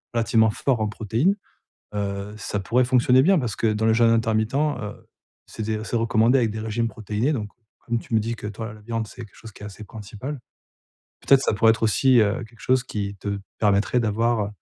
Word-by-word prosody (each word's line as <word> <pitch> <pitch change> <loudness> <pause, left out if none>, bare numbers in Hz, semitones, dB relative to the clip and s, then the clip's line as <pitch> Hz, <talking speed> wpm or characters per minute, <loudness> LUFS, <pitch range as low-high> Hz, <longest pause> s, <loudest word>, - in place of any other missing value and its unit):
relativement 115 -1 +3
fort 125 +2 0
en 110 - 0
protéines, 110 - 0 0.6
heu, 100 0 -3
ça 105 -1 -3
pourrait 120 +6 +2
fonctionner 125 +1 +4
bien 190 +3 +4
parce 120 -7 -3
que - - -2
dans 110 +1 0
le 110 - +4
jeûne 115 0 +4
intermittent, 110 0 +1
heu, 135 -8 -2 0.4
c'est 110 - -6
des 110 0 -2
c'est 115 - -4
recommandé 115 +2 +3
avec 115 -4 +1
des 110 - -5
régimes 110 +1 -1
protéinés 110 +5 -2
donc, 105 -6 -3 0.3
comme 120 -1 -2
tu 115 - -8
me 110 - +4
dis 115 +2 -3
que 110 - -10
toi 110 +2 -6
la 105 - -16
viande, 115 0 -3
c'est 120 +2 -9
quelque 100 - -22
chose 115 - -12
qui 105 - -14
est - - -5
assez 105 +1 -9
principal. 110 +7 -8 0.8
Peut-être 135 -1 +4
ça - - +1
pourrait 110 +2 +4
être 115 - -6
aussi, 120 +3 +4
heu, 105 +3 +1
quelque 115 0 -18
chose 130 -1 +1
qui 100 -5 -4
te 100 +1 -4 0.2
permettrait 105 +3 +2
d'avoir, 115 0 +1
heu, - - -5
110 Hz, 220 wpm, -23 LUFS, 105-120 Hz, 0.8 s, fonctionner